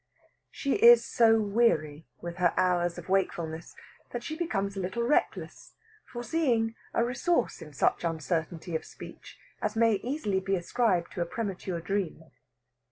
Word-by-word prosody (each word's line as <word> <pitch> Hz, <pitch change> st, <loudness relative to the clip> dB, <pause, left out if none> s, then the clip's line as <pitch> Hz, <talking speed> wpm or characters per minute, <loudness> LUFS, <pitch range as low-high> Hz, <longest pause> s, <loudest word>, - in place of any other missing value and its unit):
She 275 Hz, -, -1 dB
is 470 Hz, +3 st, +8 dB
so 225 Hz, -2 st, +4 dB
weary 200 Hz, -9 st, +1 dB
with 170 Hz, 0 st, -6 dB
her 175 Hz, -2 st, +2 dB
hours 175 Hz, -1 st, +1 dB
of -, -, -9 dB
wakefulness 170 Hz, -4 st, -1 dB, 0.3 s
that 240 Hz, -1 st, -5 dB
she 315 Hz, -, -4 dB
becomes 200 Hz, -, -2 dB
a -, -, -4 dB
little 190 Hz, +6 st, -2 dB
reckless, 245 Hz, +5 st, -1 dB, 0.3 s
foreseeing 240 Hz, -3 st, 0 dB, 0.2 s
a 230 Hz, -, +1 dB
resource 270 Hz, +8 st, 0 dB
in 150 Hz, -, -10 dB
such 145 Hz, -, +1 dB
uncertainty 165 Hz, +1 st, -2 dB
of -, -, -2 dB
speech -, -, -12 dB, 0.2 s
as 210 Hz, +1 st, -1 dB
may 225 Hz, -2 st, +4 dB
easily 245 Hz, -7 st, -1 dB
be 195 Hz, +1 st, -1 dB
ascribed 180 Hz, -1 st, 0 dB
to 180 Hz, -, -4 dB
a 170 Hz, -, -1 dB
premature 185 Hz, -3 st, -4 dB
dream. 195 Hz, 0 st, -2 dB
195 Hz, 150 wpm, -29 LUFS, 175-235 Hz, 0.3 s, is